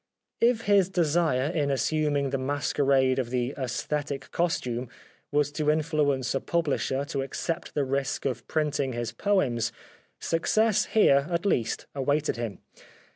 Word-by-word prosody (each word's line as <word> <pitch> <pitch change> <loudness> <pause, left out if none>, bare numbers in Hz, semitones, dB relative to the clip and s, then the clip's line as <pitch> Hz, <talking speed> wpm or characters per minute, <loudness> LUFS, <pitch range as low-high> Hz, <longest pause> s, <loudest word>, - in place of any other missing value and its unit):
If 235 -1 +3
his 200 -3 +3
desire 160 -6 +1
in 150 -4 0
assuming 140 +1 0
the 135 - -1
masquerade 135 -1 +1
of 125 -3 -2
the 125 +1 -1
" - - -23
aesthetic 140 +2 -3
costume 125 -8 -1 0.2
" - - -34
was 145 0 +1
to 150 0 -1
influence 150 -4 +1
a 135 - +1
publisher 145 -4 0
to 140 -1 -3
accept 160 +5 -4
the 145 - +2
risk 135 0 -2
of 120 -3 -3
printing 145 -4 0
his 120 -1 -3
poems, 140 - +1 0.5
success 215 +6 +2
here, 140 -10 +4
at 170 +2 -1
least, 120 - 0
awaited 145 +3 0
him. 115 -5 -4
145 Hz, 145 wpm, -27 LUFS, 130-160 Hz, 0.5 s, here